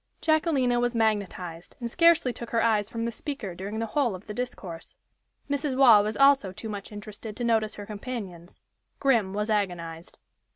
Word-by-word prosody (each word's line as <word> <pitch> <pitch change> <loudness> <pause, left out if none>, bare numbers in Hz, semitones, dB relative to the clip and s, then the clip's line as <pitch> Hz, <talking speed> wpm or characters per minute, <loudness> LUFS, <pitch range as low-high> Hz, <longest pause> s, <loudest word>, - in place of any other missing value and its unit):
Jacquelina 300 -6 +2
was 245 0 0
magnetized, 200 -6 -1
and 235 -2 -4
scarcely 335 -6 +4
took 235 - -8
her 230 -1 +1
eyes 215 -2 +2
from 230 0 -3
the 235 - -1
speaker 230 -6 -5
during 195 +5 -6
the 225 - -1
whole 240 -2 0
of 185 - -11
the 210 - -6
discourse. 195 -8 -6 0.5
Mrs. 285 -1 -1
Waugh 235 -6 +8
was 215 +1 -2
also 275 -8 +5
too 220 +4 -7
much 205 -1 -6
interested 210 +1 -8
to 245 - -3
notice 220 -2 +1
her 205 - -7
companions. 200 -5 -7 0.4
Grim 230 -9 +2
was 210 +2 -2
agonized. 175 -5 -3
220 Hz, 175 wpm, -27 LUFS, 200-250 Hz, 0.5 s, Waugh